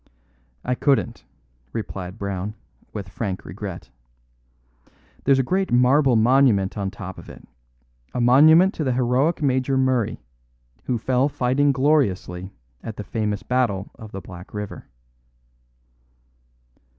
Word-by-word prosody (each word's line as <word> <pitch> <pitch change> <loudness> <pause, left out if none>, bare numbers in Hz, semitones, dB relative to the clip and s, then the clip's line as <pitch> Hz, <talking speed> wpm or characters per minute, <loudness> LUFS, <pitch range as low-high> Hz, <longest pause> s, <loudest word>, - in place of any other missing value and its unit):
"I 125 - +1
couldn't," 125 -3 0 0.5
replied 95 -3 -5
Brown, 100 0 -4 0.4
with 100 -4 -6
frank 95 0 -4
regret. - - -7 1.3
"There's 135 0 +5
a 135 - +2
great 190 +8 0
marble 125 +2 +4
monument 115 -4 +3
on 100 -2 -2
top 95 -1 -8
of - - -12
it; - - -13 0.6
a - - -3
monument 155 - +6
to 155 - -3
the 130 -3 0
heroic 130 +6 +1
Major 130 0 +1
Murray, 130 - +1 0.7
who 125 - 0
fell 130 +4 +1
fighting 140 +1 +2
gloriously 125 -10 +1 0.3
at 110 - -7
the 105 - -5
famous 105 -1 -2
Battle 115 -6 0
of 110 -1 -12
the 95 - -6
Black 90 +2 -11
River." 105 -1 -6
125 Hz, 125 wpm, -23 LUFS, 100-135 Hz, 1.3 s, monument